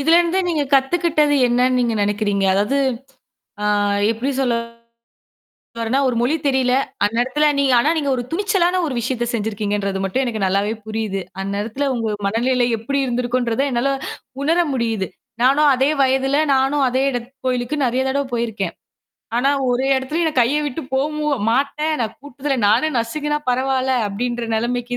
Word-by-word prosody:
இதுலருந்து 340 +4 +3
நீங்க 310 -4 0
கத்துக்கிட்டது 300 +1 +2
என்னன்னு 250 +1 +2
நீங்க 235 -2 0
நெனைக்கிறீங்க? 205 -1 0
அதாவது 210 +8 +1 0.9
ஆ - - +1 0.4
எப்பிடி 240 +5 -2
சொல்ல 245 -3 +1 1.2
வர்றேன்னா 230 +4 +1
ஒரு 245 - -1
மொழி 255 +6 +1
தெரியல. 260 -2 +2 0.3
அந்நேரத்துல 250 +8 +1
நீங்க 275 -2 +3
ஆனா 300 - +2
நீங்க 285 -2 -1
ஒரு 245 - -2
துணிச்சலான 370 -1 +1
ஒரு 275 - -3
விஷயத்த 240 0 -2
செஞ்சுருக்கீங்கன்றது 205 -3 -2
மட்டும் 195 +8 0
எனக்கு 225 -4 -3
நல்லாவே 200 +3 +1
புரியுது. 215 -3 -3 0.2
அந்நேரத்துல 215 +8 -2
உங்க 225 -3 -2
மனநிலை 245 +4 +1
எப்பிடி 275 +6 -1
இருந்திருக்குன்றத 245 0 0
என்னால 245 +3 +1 0.5
உணர 330 +4 +2
முடியுது. 225 -6 -1 0.4
நானும் 285 +3 +5
அதே 265 +3 +2
வயதுல, 265 +1 +2 0.2
நானும் 270 +1 +2
அதே 260 +2 0
இட 245 - -1 0.3
கோயிலுக்கு 250 +3 -1
நெறைய 255 +2 +1
தடவ 280 +1 0
போயிருக்கேன். 220 -6 -2 0.6
ஆனா 265 +3 +3 0.2
ஒரே 250 +2 0
இடத்துலயும் 300 +6 -1
என்ன 310 - -1
கைய 255 +6 +2
விட்டு 285 +3 -4
போகவே 300 +3 -1 0.3
மாட்டேன். 285 +5 0
நான் 225 -1 -3
கூட்டத்துல 280 0 -3
நானு 240 +9 +3
நசுங்குன்னா 295 +6 -1
பரவால்ல, 260 +1 0 0.2
அப்பிடின்ற 240 +3 -3
நிலைமைக்கு 245 +1 -2
255 Hz, 145 wpm, -20 LUFS, 230-280 Hz, 1.2 s, நானும்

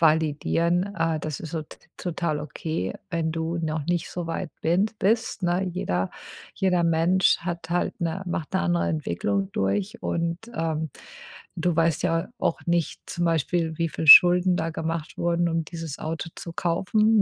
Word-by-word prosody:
validieren. 165 +4 +2
Äh, 165 -2 0
das 155 -3 -4
ist 160 - -7
so 160 -2 -2
t - - -15 0.2
total 170 -3 -2
okay, 150 - -3 0.2
wenn 160 -1 -1
du 165 +1 -2
noch 155 -2 -2
nicht 175 -1 -1
so 175 -2 -4
weit 165 0 -3
bin 175 +6 +3
bist, 220 -2 +1
ne? 175 +2 +1
Jeder 95 - -2 0.4
jeder 180 -2 +2
Mensch 170 +3 +3
hat 170 -1 -5
halt 175 - -1
'ne 170 +3 -2
macht 165 -3 -3
'ne - - +2
andere 85 0 +1
Entwicklung 95 +5 -1
durch. 185 - -1
Und, 170 0 -1 0.2
ähm, 160 -3 -2 0.7
du 175 -2 0
weißt 165 -1 +2
ja 165 -2 0
auch - - 0
nicht, 170 -2 0
zum 175 - -2
Beispiel, 165 0 0
wie 165 -1 +1
viel 160 - -4
Schulden 180 +2 +9
da 165 +1 -1
gemacht 160 -1 -4
wurden, 170 0 +1
um 165 -1 -1
dieses 165 -3 -7
Auto 160 0 -4
zu 170 - -8
kaufen. 210 +6 +2
165 Hz, 165 wpm, -25 LUFS, 160-175 Hz, 0.7 s, Schulden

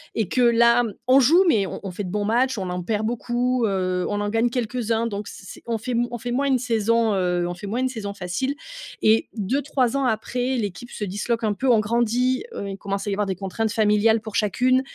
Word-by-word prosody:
et 220 -4 0
que 250 - 0
là, 235 0 +5
mmh, 225 -4 -3
on 265 +2 +6
joue 325 +9 +5
mais 205 - +3
on - - -6
on 195 - -5
fait 200 +3 -5
de 180 - -5
bons 205 +1 -1
matches, 245 +3 +1
on 185 -2 -3
en 180 - -3
perd 215 +3 -1
beaucoup, 245 +2 0
heu, 185 -2 -1
on 205 - -1
en 205 - -1
gagne 225 +3 +1
quelques-uns 235 -1 -1
donc 205 -2 -4
c - - -10
c'est - - -11
on 230 - 0
fait 245 +3 -4 0.2
on 240 - -5
fait 240 +2 -5
moins 275 +3 +1
une 265 -2 +3
saison, 230 -2 +1
heu, 180 -2 0
on 175 - -3
fait 190 +3 -8
moins 230 +5 -2
une 260 - +1
saison 205 -5 -5
facile 200 +10 -2 0.5
et 220 +1 +4
2-3 260 +3 0
ans 275 - 0
après, 245 +2 -1
l'équipe 220 +2 -4
se 210 - -6
disloque 210 +4 -2
un 215 -2 +1
peu. 260 +5 -1
On 230 - +5
grandit. 240 - +1
Heu, 200 - -4
il 195 - -6
commence 200 0 -3
à 205 - -2
y - - 0
avoir 205 0 -1
des 190 - -2
contraintes 200 +4 -2
familiales 215 +1 +3
pour 220 -1 -8
chacune. 250 +5 +2
225 Hz, 245 wpm, -23 LUFS, 205-245 Hz, 0.5 s, on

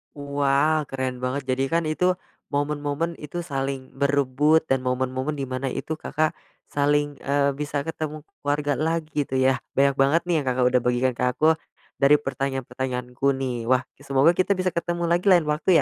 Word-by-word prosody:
Wow, 145 +1 +1
keren 130 -2 -3
banget, 135 +2 -1
jadi 130 +1 +1
kan 165 +3 +1
itu 180 +3 +2 0.3
momen-momen 145 +3 -2
itu 170 +4 -5
saling 135 -3 -4
berebut 140 +2 +3
dan 135 -4 +1
momen-momen 130 +3 -1
di 140 - -3
mana 130 +1 -3
itu 135 - -4
Kakak 155 0 0 0.4
saling, 145 0 +1
eee, 140 0 +1
bisa 145 -1 -2
ketemu 155 -1 -5 0.2
keluarga 145 -1 0
lagi 155 -2 -1
itu 130 - -4
ya, 130 0 +3 0.2
banyak 140 0 +3
banget 145 +5 +4
nih 175 -1 -1
yang 140 - -5
Kakak 125 0 +1
udah 125 - +4
bagikan 125 +1 +2
ke - - 0
aku, 155 - +1 0.5
dari 140 +1 +6
pertanyaan-pertanyaanku 130 -2 -3
nih. 125 -3 -3
Wah, 130 0 +3 0.2
ki - - -18
semoga 140 +4 +5
kita 185 +3 +1
bisa 185 -1 0
ketemu 170 0 -2
lagi 175 +3 +1
lain 180 -4 +6
waktu 150 +5 -1
140 Hz, 170 wpm, -24 LUFS, 130-155 Hz, 0.5 s, dari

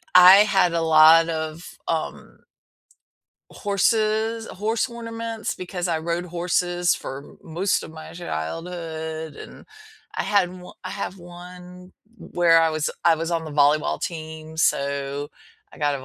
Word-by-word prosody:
I 180 +2 +10
had 195 -4 +3
a 165 - +1
lot 160 +1 +7
of, 160 0 -4 0.3
um 160 -1 -4 1.1
horses 220 +2 0
horse 220 +5 -2
ornaments 230 -1 -5
because 180 -1 -4
I 165 -2 0
rode 170 +2 -2
horses 175 0 0
for 135 +2 -8
most 175 +4 -1
of - - -9
my 160 0 -10
childhood 160 - -5
and - - -12 0.5
I - - -1
had 200 -4 +2
o 180 0 -12
I - - -5
have 195 -1 -5
one 180 +1 -12 0.2
w - - -13
where 165 -1 +6
I 165 -1 +3
was 155 -1 -1 0.2
I 165 -1 +5
was 165 +2 -3
on 165 -1 -1
the 155 - -7
volleyball 145 +2 +3
team, 160 -1 -6
so 140 -1 -1 0.4
I - - -14
got 145 -1 +1
a 130 - -10
170 Hz, 145 wpm, -23 LUFS, 160-185 Hz, 1.1 s, I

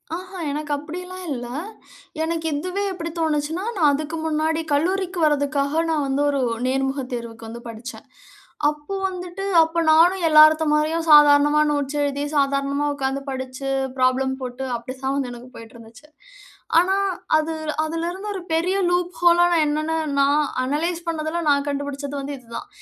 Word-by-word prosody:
ஆஹான், 370 -2 -6
எனக்கு 300 +1 -4
அப்படியெல்லாம் 360 +5 -8
இல்ல. 245 -2 -5 0.8
எனக்கு 325 0 -2
இதுவே 365 +6 -3
எப்டி 335 -2 -5
தோணுச்சுனா, 315 +2 -1
நான் 305 -5 +4
அதுக்கு 310 +3 -3
முன்னாடி 315 +1 0
கல்லூரிக்கு 365 +4 0
வரதுக்காக 285 +1 +1
நான் 310 -3 +1
வந்து 270 +1 0
ஒரு 280 -1 0 0.3
நேர்முக 270 +1 -1
தேர்வுக்கு 230 -1 -6
வந்து 235 +1 -8
படிச்சேன். 230 +3 -9 0.6
அப்போ 300 +5 -6
வந்துட்டு 360 +1 -7 0.2
அப்போ 325 +1 -2
நானும் 350 +4 +5
எல்லாருத்த 310 +1 +7
மாரியும் 320 +2 0
சாதாரணமா 295 0 +7
நோட்ஸ் 290 0 -2
எழுதி, 285 0 -1
சாதாரணமா 280 0 +1
உட்கார்ந்து 270 0 -2
படிச்சு, 260 0 -5 0.3
ப்ராப்ளம் 260 +1 +2
போட்டு 250 +1 -5
அப்டித்தான் 260 +3 -4
வந்து 265 -3 -2
எனக்கு 240 +1 -11
போயிட்டுருந்துச்சு. 230 +4 -13 0.7
ஆனா 365 +3 +2 0.4
அது 310 +1 -1 0.3
அதுலருந்து 340 +5 -4
ஒரு - - -3
பெரிய 355 +4 +1
லூப் 355 0 0
ஹோல்லா 345 0 +5 0.2
என்னானா 310 +2 -1 0.2
நான் 285 +2 +3 0.2
அனலைஸ் 330 +6 -2
பண்ணதெல்லாம் 325 0 -2
நான் 280 0 +1
கண்டுபுடிச்சது 285 0 -4
வந்து 280 +1 -5
இது 245 - -23
தான். 405 - -6
295 Hz, 140 wpm, -22 LUFS, 275-330 Hz, 0.8 s, எல்லாருத்த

